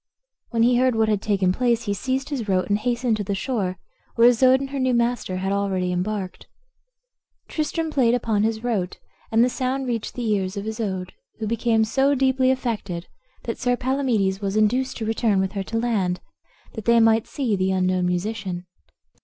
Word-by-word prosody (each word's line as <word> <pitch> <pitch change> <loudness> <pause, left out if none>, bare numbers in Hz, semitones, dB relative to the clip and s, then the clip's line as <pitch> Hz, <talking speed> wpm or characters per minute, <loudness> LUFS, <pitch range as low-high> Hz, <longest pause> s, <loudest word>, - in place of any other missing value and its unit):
When 230 -2 +1
he 245 +1 +4
heard 255 -1 +3
what 220 -1 +2
had 210 -2 +1
taken 195 -4 +1
place 235 0 +1
he 205 -3 -1
seized 265 +6 -2
his 245 -8 -3
rote, 185 0 +1
and 205 +1 +2
hastened 240 0 0
to 210 - -2
the 200 0 -2
shore, 195 -5 -2 0.4
where 235 0 +6
Isoude 255 +2 +4
and 275 0 -5
her 280 - -3
new 255 -1 +2
master 235 -5 0
had 190 +1 -2
already 195 -2 0
embarked. 185 +1 -3 1.0
Tristram 320 +1 -2
played 245 -5 +3
upon 225 -4 0
his 220 +1 0
rote, 205 -7 -1 0.3
and 225 +1 +5
the - - +4
sound 260 +1 -2
reached 235 -3 -3
the 245 -2 -3
ears 200 -2 0
of 200 - -4
Isoude, 200 -5 -3 0.2
who 220 - -4
became 225 0 +1
so 270 +5 +2
deeply 260 -1 +2
affected, 215 -9 -2 0.3
that 230 - -4
Sir 245 -1 +1
Palamedes 240 -8 0
was 200 0 -2
induced 245 +5 +1
to 225 - -3
return 220 -2 +1
with 190 0 0
her 195 - -3
to 225 - -3
land, 205 -6 0 0.5
that 220 -3 -7
they 235 0 +5
might 225 0 +4
see 250 -7 -1
the 190 0 0
unknown 185 -1 +1
musician. 185 0 -3
225 Hz, 190 wpm, -23 LUFS, 195-245 Hz, 1.0 s, where